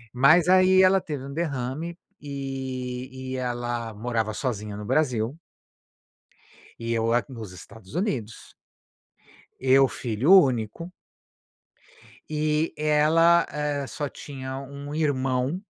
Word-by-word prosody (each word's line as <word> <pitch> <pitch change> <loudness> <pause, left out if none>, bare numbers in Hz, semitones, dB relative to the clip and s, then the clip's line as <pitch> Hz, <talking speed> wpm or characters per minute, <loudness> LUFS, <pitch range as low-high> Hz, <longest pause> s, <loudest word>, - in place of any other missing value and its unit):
Mas 155 +7 +5
aí 185 +1 +6
ela 190 +1 +5
teve 145 -6 -5
um 140 - -7
derrame 155 +1 -3 0.2
e, 130 -2 -5
e - - -2
ela 120 -3 -3
morava 110 0 -1
sozinha 105 -3 -4
no 105 - -7
Brasil 125 -2 0 1.4
e 115 0 -3
eu 115 0 +1
a 120 - +2
nos 115 -7 -8
Estados 95 - -13
Unidos. 130 - -3 1.1
Eu 135 +1 +5
filho 120 - -1
único 135 - +3 1.4
e 155 +1 0
ela, 155 +3 +4
eh, 145 -1 -2
só 145 +1 -4
tinha 130 -2 -7
1 140 +2 -8
irmão, 135 0 0
135 Hz, 110 wpm, -25 LUFS, 120-155 Hz, 1.4 s, aí